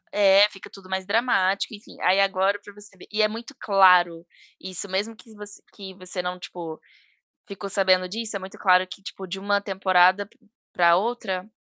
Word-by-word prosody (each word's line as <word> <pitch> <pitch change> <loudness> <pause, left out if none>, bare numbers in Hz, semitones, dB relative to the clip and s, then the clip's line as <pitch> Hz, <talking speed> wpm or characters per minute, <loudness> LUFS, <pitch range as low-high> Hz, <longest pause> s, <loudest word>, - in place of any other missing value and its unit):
É, 200 0 +5
fica 195 -2 -13
tudo 190 -1 -15
mais 190 0 -3
dramático, 200 -2 +1
enfim. 210 0 -13
Aí 185 +2 +3
agora 195 +1 +1
pra 205 - -14
você 200 -1 -13
ver - - -15
e 215 +1 0
é 215 - +4
muito 235 +6 -9
claro 180 -6 +4 0.3
isso, 185 +1 -4
mesmo 205 +4 -2
que 220 +1 -17
voc 210 -1 -10 0.3
que 195 -2 -10
você 185 0 -6
não, 180 0 -4
tipo, 175 -2 -8 0.7
ficou 200 0 -7
sabendo 185 -1 +2
disso, 220 +2 -4
é - - -2
muito 190 0 -10
claro 185 -1 +4
que, 190 - -11
tipo, 190 +1 -9
de 190 +2 -6
uma 200 +1 +1
temporada 190 0 +3
p - - -29 0.3
pra 170 -1 +4
outra, 200 -2 -3
195 Hz, 190 wpm, -24 LUFS, 185-205 Hz, 0.7 s, É